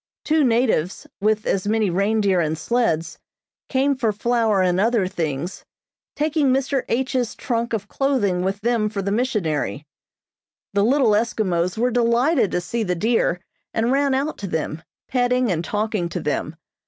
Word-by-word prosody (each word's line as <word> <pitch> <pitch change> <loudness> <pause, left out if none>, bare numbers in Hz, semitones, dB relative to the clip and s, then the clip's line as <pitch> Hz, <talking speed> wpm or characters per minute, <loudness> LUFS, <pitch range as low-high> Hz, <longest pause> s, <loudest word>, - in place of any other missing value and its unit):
Two 310 0 +3
natives, 230 - +1
with 215 +1 +1
as 195 0 0
many 215 -3 +1
reindeer 200 0 +2
and 160 -1 0
sleds, 175 -7 -1 0.5
came 275 +1 +2
for 235 -4 0
flour 220 -2 +1
and 180 0 +2
other 225 -1 +2
things, 170 -2 -3 0.5
taking 300 -1 +1
Mr. 270 0 0
H.'s 255 -1 -1
trunk 235 -2 -2
of 210 -3 -2
clothing 225 -10 0
with 195 +2 -2
them 230 -2 +1
for 200 -2 -4
the 200 - -1
missionary. 200 - -1 0.9
The 200 0 +2
little 255 0 +3
Eskimos 205 -5 0
were 245 +2 +1
delighted 240 - +2
to 180 - -1
see 230 +7 -3
the 180 -4 0
deer, 190 -3 +1 0.3
and 230 +2 +1
ran 275 0 +2
out 285 +4 -2
to 200 - -4
them, 160 -2 -3 0.3
petting 250 -2 +1
and 165 -1 -1
talking 210 -3 -1
to - - -4
them. 150 +1 -2
220 Hz, 155 wpm, -22 LUFS, 185-245 Hz, 0.9 s, Two